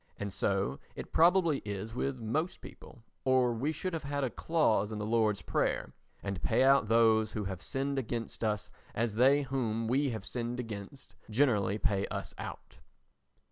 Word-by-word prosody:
And 100 -2 -4
so 95 -11 0 0.2
it - - -8
probably 170 -3 +4
is 105 +1 -5
with 135 +2 -2
most 145 +10 -2
people 120 - -13 0.2
or 130 -2 +3
we 130 +7 -1
should 185 +3 -4
have 165 - -2
had 140 0 -2
a 130 - 0
clause 110 -11 +1
in 110 - -4
the 105 - -3
Lord's 110 -2 +1
prayer: - - -1 0.3
"And 100 -3 -3
pay - - +3
out 135 -4 +5
those 110 -1 +4
who 105 - -2
have 95 -2 -5
sinned 140 0 -2
against 115 -2 -4
us 105 -1 -1 0.2
as 115 -1 0
they 135 +6 +4
whom 115 -4 -1
we 135 +4 +2
have 110 -3 -5
sinned 120 0 -3
against 110 -1 -7 0.2
generally 105 -5 +2
pay 100 -2 0
us - - -5
out." - - -8
115 Hz, 175 wpm, -31 LUFS, 105-135 Hz, 0.3 s, out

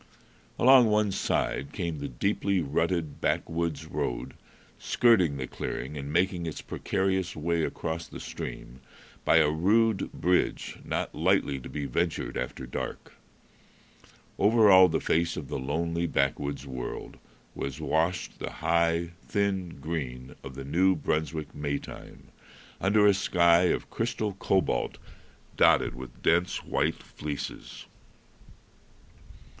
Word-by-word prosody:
Along 130 -1 +7
one 105 -1 +2
side 70 -6 -1
came 85 -6 -3
the 70 - -4
deeply 100 +8 0
rutted 80 +1 -1
backwoods 80 -2 -1
road, 60 -5 -3 0.5
skirting 95 -12 +3
the 65 - -3
clearing 65 +3 -5
and 70 0 -5
making 85 +1 +1
its 80 - -5
precarious 95 -1 -1
way 85 +1 0
across 80 +2 -3
the - - -9
stream 65 +2 -7 0.4
by - - +5
a 75 -2 +5
rude 105 +6 +2
bridge 90 +2 0
not - - -3
lightly 70 -2 +1
to 60 - -9
be 75 -2 -4
ventured 85 +6 -1
after 65 - -4
dark. 60 - -6 1.3
Over 105 0 +5
all 95 -1 +9
the 80 - 0
face 85 +1 0
of 70 - -6
the - - -3
lonely 85 +5 -1
backwoods 70 0 -1
world 65 -2 -6 0.4
was 70 -1 -5
washed 85 +3 -1
the - - -4
high, 85 0 +1 0.2
thin 95 -6 -1
green 65 -5 -5
of 65 - -8
the 70 0 -7
New 95 +6 +3
Brunswick 80 0 -2
May 70 -1 -2
time, - - -11 0.5
under 105 +3 +4
a 100 - +7
sky 85 -2 +4
of - - -1
crystal 115 -3 -2
cobalt 95 0 0 0.6
dotted - - +4
with 65 -1 -11
dense 85 +2 +2
white - - -1
fleeces. 75 -2 -6
85 Hz, 130 wpm, -28 LUFS, 70-95 Hz, 1.3 s, all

